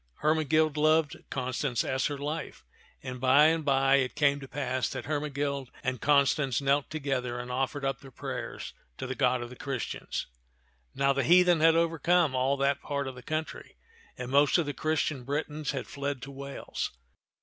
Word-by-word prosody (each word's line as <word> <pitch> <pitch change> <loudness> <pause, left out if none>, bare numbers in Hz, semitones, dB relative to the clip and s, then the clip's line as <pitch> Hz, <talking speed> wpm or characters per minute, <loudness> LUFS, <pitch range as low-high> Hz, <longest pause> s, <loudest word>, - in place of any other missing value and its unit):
Hermegild 155 0 +2
loved 155 0 +3
Constance 130 -1 -1
as 130 0 0
her 145 - -4
life, 145 - -5 0.4
and 125 -1 -6
by 130 +3 +6
and 160 0 +3
by 135 -1 +4
it 130 -2 -1
came 145 -1 +3
to 135 - -9
pass 130 -2 -2
that 130 -3 -5
Hermegild 140 -3 -2
and 130 -3 -2
Constance 140 -3 +3
knelt 140 0 +1
together 135 -5 -2
and 125 0 -6
offered 135 +2 -2
up 135 -3 -1
their 135 - -12
prayers 130 - -6 0.2
to - - -5
the - - -3
God 125 -1 +1
of 120 - -9
the - - -9
Christians. 135 -1 -4 0.7
Now 140 0 +3
the 140 - 0
heathen 175 +3 +5
had 165 +1 +5
overcome 165 -1 +2
all 130 +2 +1
that 140 0 +1
part 140 -1 -3
of 135 - -5
the 125 - -11
country, 155 +3 -5 0.4
and 125 0 -5
most 140 +3 +5
of 170 - +1
the 145 - -3
Christian 155 -4 -1
Britons 150 +2 -3
had 135 -4 -2
fled 140 -1 -4
to 140 - -7
Wales. 140 0 -5
140 Hz, 180 wpm, -29 LUFS, 130-150 Hz, 0.7 s, by